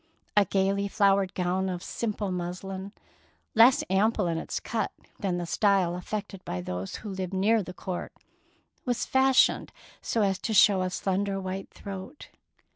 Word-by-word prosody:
A 205 -1 +6
gaily 195 +2 +1
flowered 195 -2 +2
gown 185 +1 0
of 180 -1 -4
simple 210 -3 -3
muslin, 190 +2 -5 0.6
less 235 +4 +6
ample 205 +2 +2
in 165 -1 0
its - - -4
cut 225 -1 -2 0.3
than 190 -4 -1
the 175 - -3
style 190 -1 +2
affected 195 +1 -5
by 90 - -4
those 90 +1 -4
who - - -4
lived 190 0 -4
nearer 215 +4 +3
the 180 - -7
court, 180 0 -5 0.7
was 245 -2 -1
fashioned 265 0 +3 0.3
so 225 - 0
as 195 -1 +1
to 220 - -2
show 200 -1 +6
a 185 - 0
slender 195 +1 -1
white 190 0 -5
throat. 195 +7 -9
195 Hz, 155 wpm, -28 LUFS, 185-205 Hz, 0.7 s, A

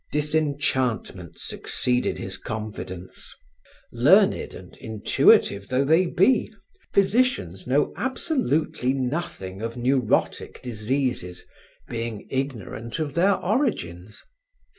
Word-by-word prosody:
Disenchantment 140 - -1
succeeded 125 0 -1
his 95 0 -4
confidence. 100 -4 -6 0.6
Learned - - +4
and - - -12
intuitive 100 -2 +3
though 130 +2 +1
they 165 +5 +4
be, 210 +8 +3 0.4
physicians 195 - +1
know 140 +3 +2
absolutely 245 - 0
nothing 125 - -3
of 115 +1 -4
neurotic 125 -1 0
diseases, 120 -5 -2 0.4
being 115 -3 -4
ignorant 125 - -4
of 155 -4 -3
their 190 +5 +4
origins. 110 - -2
130 Hz, 90 wpm, -25 LUFS, 105-155 Hz, 0.6 s, Learned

